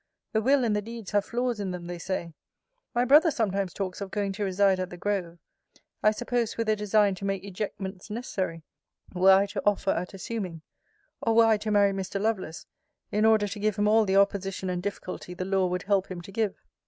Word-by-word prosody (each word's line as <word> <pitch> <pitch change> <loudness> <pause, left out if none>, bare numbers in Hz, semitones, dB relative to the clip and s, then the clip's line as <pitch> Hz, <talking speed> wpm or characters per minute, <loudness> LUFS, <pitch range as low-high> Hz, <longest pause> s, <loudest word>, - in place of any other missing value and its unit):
The 220 - +2
will 265 +3 +3
and 220 -3 +1
the 210 - 0
deeds 230 -1 -8
have 205 -1 +2
flaws 245 -1 -1
in 200 -2 -2
them, 180 -1 -5
they 175 0 -6
say. 170 -2 -3 0.6
My 240 +1 +3
brother 300 +6 +6
sometimes 200 - -1
talks 190 +1 -4
of 200 - -4
going 200 0 -1
to 205 +1 -3
reside 195 0 +2
at 185 -1 -2
The 175 - -9
Grove: 180 -3 -2 0.6
I 215 - +5
suppose, 240 +1 -1
with 230 -1 -1
a 215 - +4
design 210 -1 +3
to 190 +1 -6
make 195 -1 -2
ejectments 195 -1 -6
necessary, 190 -7 -3 0.5
were 185 +1 +6
I 195 +1 +5
to - - -4
offer 200 -1 +2
at 180 +3 -3
assuming; 185 -5 -5 0.6
or, 225 - +1
were 230 0 +7
I 220 -1 +4
to 215 +1 -4
marry 205 -1 +4
Mr. 195 0 -3
Lovelace, 195 -6 -2 0.5
in 210 +1 +2
order 220 -2 +4
to 205 +1 -6
give 210 0 +1
him 205 0 +1
all 220 +1 +5
the 190 -1 +1
opposition 195 -1 +1
and 180 -1 -2
difficulty 185 -2 -5
the 185 - -4
law 190 -1 +2
would 180 0 -2
help 195 -1 +1
him 180 -2 -6
to 195 - -11
give. 215 -1 -1
200 Hz, 215 wpm, -27 LUFS, 185-215 Hz, 0.6 s, were